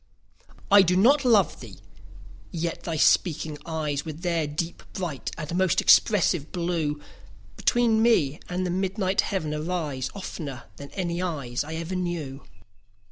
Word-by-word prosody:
I 200 0 +9
do 180 -1 +2
not 265 +10 +5
love 220 -9 +3
thee!—yet 95 - -9
thy 165 -2 -3
speaking 155 -1 +2
eyes, 150 -3 -2
With 160 +1 -8
their 170 -3 0
deep, 165 +4 -4
bright, 175 -9 -4
and 165 +1 -4
most 185 0 +2
expressive 175 -7 +4
blue, 170 -4 -1 0.6
Between 230 -2 +2
me 165 - +3
and 180 +1 -2
the 180 - -1
midnight 190 +1 0
heaven 160 -7 -2
arise, 150 -4 -3
15 - - -12
Oftener 140 -10 -6
than 140 - -9
any 175 -2 -2
eyes 140 -8 -2
I 155 +2 -6
ever 165 +3 -4
knew. 170 -7 -4
170 Hz, 140 wpm, -26 LUFS, 145-185 Hz, 0.6 s, I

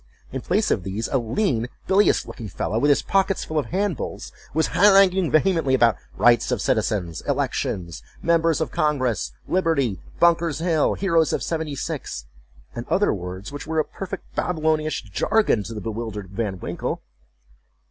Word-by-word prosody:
In 130 - -4
place 205 - +1
of 100 - +1
these, 95 +5 -3
a 135 - +2
lean, 120 - 0 0.2
bilious 195 +2 +3
looking 115 - -8
fellow, 95 +5 -2
with 145 - +3
his 145 - +3
pockets 195 -1 +1
full 155 -1 -1
of 145 - -3
handbills, 190 - -3 0.2
was 160 +1 +1
haranguing 190 0 +5
vehemently 155 -4 +3
about 120 -3 +4 0.2
rights 120 0 +4
of 125 - 0
citizens—elections—members 105 - -1
of 160 - -1
congress—liberty—Bunker's 150 - 0
Hill—heroes 165 +1 +2
of - - -1
seventy 160 -3 -2
six—and - - -7
other 205 +2 +2
words, 95 +3 -6
which 145 +1 -7
were 160 0 -2
a 155 - +2
perfect 195 0 -7
Babylonish 155 -3 0
jargon 110 - +1
to 115 - -7
the - - -4
bewildered 110 -4 -5
Van 100 -3 -3
Winkle. - - -4
145 Hz, 135 wpm, -23 LUFS, 110-170 Hz, 0.2 s, haranguing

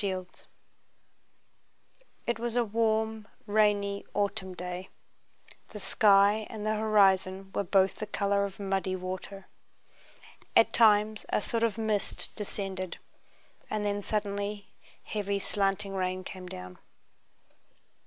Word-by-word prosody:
CHAPTER 195 -2 0
IV 185 0 -12 1.8
It 235 -1 -1
was 235 0 -3
a 240 -1 +3
warm 220 0 0 0.2
rainy 205 -1 +2
autumn 200 -2 -1
day. 180 +1 -6 0.8
The - - -9
sky 205 0 +4
and 215 -1 -6
the 215 - +2
horizon 195 -3 +3
were - - 0
both 190 0 +3
the 215 - -4
color 200 -1 +1
of 200 0 -5
muddy 195 -1 -1
water. 185 +1 -6 1.1
At - - +6
times 215 -1 +4
a - - +2
sort 230 +2 -1
of 230 -2 +1
mist 215 -2 -1
descended, 195 -3 -4 0.7
and 215 -1 -1
then 205 0 0
suddenly 205 0 -2 0.3
heavy 200 -1 -2
slanting 195 0 -1
rain 185 -1 -1
came 185 -1 -8
down. 90 - -9
200 Hz, 120 wpm, -29 LUFS, 190-215 Hz, 1.8 s, At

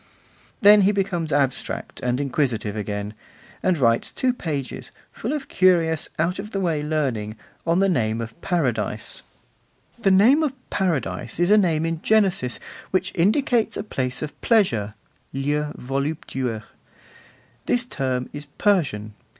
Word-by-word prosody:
Then 205 0 +8
he 195 +1 +4
becomes 190 -5 -1
abstract 140 -2 -1
and 125 +1 -1
inquisitive 125 -7 -1
again, 105 0 -4 0.5
and 185 -2 +2
writes 115 -4 +2
two 255 -1 +1
pages, 140 - -4 0.2
full 230 - -4
of 295 -2 -3
curious, 170 -4 +3
out 170 +4 0
of 210 +2 -5
the 200 - -3
way 165 -5 0
learning, 135 -9 -1 0.3
on 165 +1 +3
the 195 - +4
name 115 - +1
of 115 0 -5
Paradise: 155 - -1 0.8
The 205 - +2
name 220 +11 +6
of 300 -4 0 0.2
Paradise 150 - -1
is 175 +3 +3
a - - +8
name 165 -5 +2
in 165 -1 -2
Genesis 195 - +2 0.3
which 185 -1 0
indicates 220 - +2
a - - -3
place 130 -10 -2
of 150 - -7
pleasure 120 - +2 0.4
(lieu 145 +2 -1
voluptueux): 135 -4 -3 1.0
this 245 0 +2
term 130 - -2
is 145 0 -6
Persian. 140 - 0
155 Hz, 140 wpm, -23 LUFS, 125-195 Hz, 1.0 s, Then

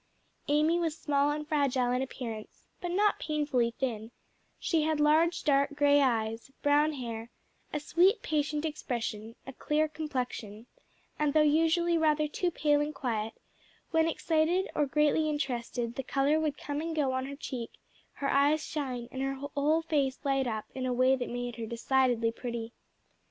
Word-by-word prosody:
Amy 305 +4 +3
was 325 -2 -1
small 285 -2 +1
and 300 0 -3
fragile 275 -5 +1
in 250 +1 +1
appearance, 235 -5 -7 0.2
but 355 - -3
not 405 +4 +2
painfully 290 -7 0
thin; 225 -4 -2 0.5
she 325 -3 +1
had 310 0 0
large 315 +3 +3
dark 280 0 +2
grey 290 0 +4
eyes, 225 -2 0
brown 295 +2 +4
hair, 230 -4 -5 0.4
a 300 - -1
sweet 355 +8 +3
patient 300 0 -1
expression, 235 -7 -4
a 270 - -8
clear 305 +4 0
complexion, 250 -8 -5 0.5
and 300 -1 +1
though 310 - +6
usually 330 +3 +3
rather 305 -1 +2
too 350 +4 -1
pale 295 -3 +2
and 300 +1 -3
quiet, 225 -3 -2 0.6
when 325 -1 +3
excited 330 +3 +1
or 295 -1 +1
greatly 300 +2 +2
interested 245 -5 -2
the 270 - -3
color 275 +4 +1
would 305 -2 -1
come 290 0 -4
and 325 0 -3
go 285 -4 +1
on 260 0 -2
her 280 - -6
cheek, 255 -5 -5 0.4
her 280 - -3
eyes 290 +2 +3
shine, 255 -6 -4
and 265 - -4
her 270 0 -1
whole 285 +3 0
face 280 -5 0
light 270 -2 +1
up 220 -2 -3
in 260 -1 -3
a 250 - 0
way 255 +2 +4
that 250 -2 -4
made 245 0 -4
her 225 -1 -4
decidedly 235 0 +1
pretty. 235 -1 -5
285 Hz, 165 wpm, -30 LUFS, 245-305 Hz, 0.6 s, though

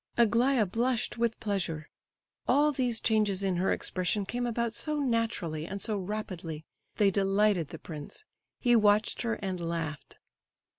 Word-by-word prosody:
Aglaya 235 +1 +4
blushed 235 +4 -1
with 230 -1 0
pleasure. 175 -7 -2 0.6
All 295 +1 +4
these 250 -5 0
changes 210 -3 +2
in 190 -2 +1
her 185 +2 +1
expression 190 +2 -1
came 245 +4 -2
about 235 -1 -1
so 305 +4 -1
naturally 225 - -1
and 200 +1 -5
so 215 +1 -1
rapidly—they 190 -1 -3
delighted 195 -3 +2
the - - -7
prince; 155 - -9 0.3
he 240 -2 +4
watched 210 -1 +3
her, 230 -2 0
and 185 -2 -2
laughed. 165 -3 -4
210 Hz, 140 wpm, -30 LUFS, 180-235 Hz, 0.6 s, Aglaya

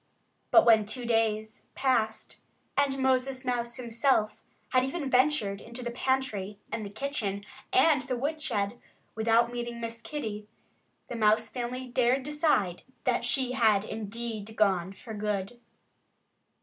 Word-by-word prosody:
But 335 - +7
when 220 -3 +6
two 245 +3 -3
days 220 -2 0
passed, 235 -5 0 0.3
and 275 -1 +2
Moses 260 0 +1
Mouse 240 -1 -1
himself 235 -2 +1 0.3
had 255 -1 +3
even 270 +1 -3
ventured 250 -7 +2
into 235 +2 -7
the 240 - -3
pantry, 240 -6 -1
and 225 0 -3
the 200 - -5
kitchen, 210 -4 -3 0.3
and 325 -7 +5
the 255 -1 -3
woodshed, 245 -6 -1 0.3
without 230 +2 +3
meeting 240 -1 -4
Miss 230 0 -5
Kitty, 220 -5 -5 0.6
the 240 - -5
Mouse 215 -1 +3
family 250 +1 -4
dared 250 +1 +2
decide 295 - +1 0.2
that - - +1
she 260 -2 +1
had 220 -5 +3
indeed 220 0 -5
gone 190 -4 +2
for 220 +3 -10
good. 210 +2 -3
235 Hz, 135 wpm, -29 LUFS, 215-260 Hz, 0.6 s, But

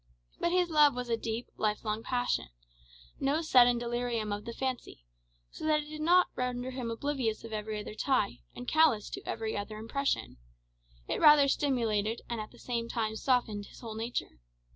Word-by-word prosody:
But 345 - +1
his 355 -1 +2
love 295 -3 +6
was 250 -1 -4
a 230 - +3
deep, 225 +1 -4
life 215 +1 -1
long 215 +1 -1
passion 245 - -1 0.7
no 290 +4 +1
sudden 245 -5 +6
delirium 235 -3 -2
of 205 0 -5
the 235 - -4
fancy 245 - -4 0.5
so - - -10
that 305 -1 +3
it 295 - -12
did 305 0 -6
not 355 +3 +5
render 250 0 -2
him 250 -2 -4
oblivious 235 -2 -2
of 230 -1 -8
every 215 0 -3
other 210 - -7
tie, 220 -2 0 0.2
and 245 - -8
callous 305 -10 +3
to - - -5
every 225 -1 -2
other 205 +1 -4
impression; 275 +6 -2 0.7
it - - -1
rather 295 -2 +8
stimulated, 230 -6 0
and 235 -2 -3
at 215 - -7
the 240 - -18
same 235 -1 -3
time 220 -2 -1
softened 220 -4 0
his - - -14
whole 225 -3 -6
nature. 225 - -4
240 Hz, 185 wpm, -31 LUFS, 220-275 Hz, 0.7 s, rather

